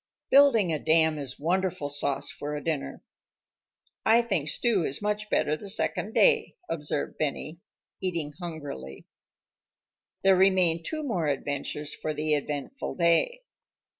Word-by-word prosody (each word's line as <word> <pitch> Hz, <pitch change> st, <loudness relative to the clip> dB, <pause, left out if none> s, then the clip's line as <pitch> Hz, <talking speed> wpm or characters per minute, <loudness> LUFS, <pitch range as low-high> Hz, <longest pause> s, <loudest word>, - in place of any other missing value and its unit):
Building 235 Hz, -, +6 dB
a 155 Hz, -, -1 dB
dam 160 Hz, -1 st, +3 dB
is 135 Hz, -3 st, -7 dB
wonderful 175 Hz, -1 st, 0 dB
sauce 145 Hz, -1 st, -2 dB
for 150 Hz, +1 st, -5 dB
a 145 Hz, -, -5 dB
dinner. 155 Hz, -4 st, -3 dB, 1.0 s
"I 230 Hz, +2 st, +5 dB
think 175 Hz, -10 st, -1 dB
stew 220 Hz, -4 st, +1 dB
is 140 Hz, -1 st, -1 dB
much 210 Hz, 0 st, -2 dB
better 150 Hz, -6 st, +1 dB
the 200 Hz, +5 st, -9 dB
second 210 Hz, +1 st, -2 dB
day," -, -, +4 dB
observed 150 Hz, -2 st, -3 dB
Benny, 155 Hz, +2 st, -2 dB, 0.4 s
eating 170 Hz, -6 st, -2 dB
hungrily. 145 Hz, -, -7 dB, 1.2 s
There 195 Hz, 0 st, +6 dB
remained 185 Hz, -3 st, +3 dB
two 310 Hz, -1 st, -3 dB
more 185 Hz, -, -1 dB
adventures 145 Hz, +1 st, -3 dB
for 155 Hz, -1 st, -4 dB
the 155 Hz, +1 st, 0 dB
eventful 150 Hz, -, -3 dB
day. 180 Hz, -, +2 dB
165 Hz, 135 wpm, -27 LUFS, 150-195 Hz, 1.2 s, Building